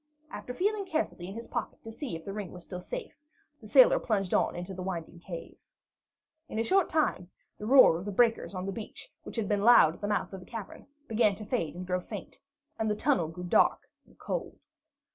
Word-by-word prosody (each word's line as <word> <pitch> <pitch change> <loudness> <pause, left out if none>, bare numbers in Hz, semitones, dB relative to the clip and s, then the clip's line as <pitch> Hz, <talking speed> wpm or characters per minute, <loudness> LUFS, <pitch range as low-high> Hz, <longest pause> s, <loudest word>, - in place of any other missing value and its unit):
After - - -6
feeling 400 +8 0
carefully 315 - -2
in 195 - -7
his 230 +1 -6
pocket - - -5
to 225 - -8
see 245 - -5
if 160 - -9
the 195 - -5
ring 205 -4 -5
was 180 -1 -10
still 180 0 -7
safe, - - -6 0.5
the - - -11
sailor - - +7
plunged 195 -5 -1
on - - +2
into 175 +2 -5
the 185 - -6
winding 175 -2 -5
cave. 170 -1 -8 0.9
In - - -5
a 225 - +2
short 380 +7 +3
time, 300 - 0 0.3
the 210 - -5
roar 255 -10 +7
of 180 - -8
the 205 - -3
breakers 225 -1 +2
on 185 0 -3
the 195 - -2
beach, 210 +1 -8
which - - -10
had 225 -4 -1
been 205 -1 +1
loud 215 -8 +7
at - - -15
the 205 - -2
mouth 205 -1 -1
of 190 - -6
the 180 - -14
cavern, 225 0 -8 0.2
began 220 -3 +3
to 215 - -9
fade 170 - -2
and 180 +1 -6
grow 180 0 0
faint, - - -8 0.4
and 220 -1 +1
the 210 - +1
tunnel 250 - +1
grew 165 +3 -8
dark 175 - +2 0.2
and - - -23
cold. - - -4
205 Hz, 225 wpm, -30 LUFS, 180-240 Hz, 0.9 s, sailor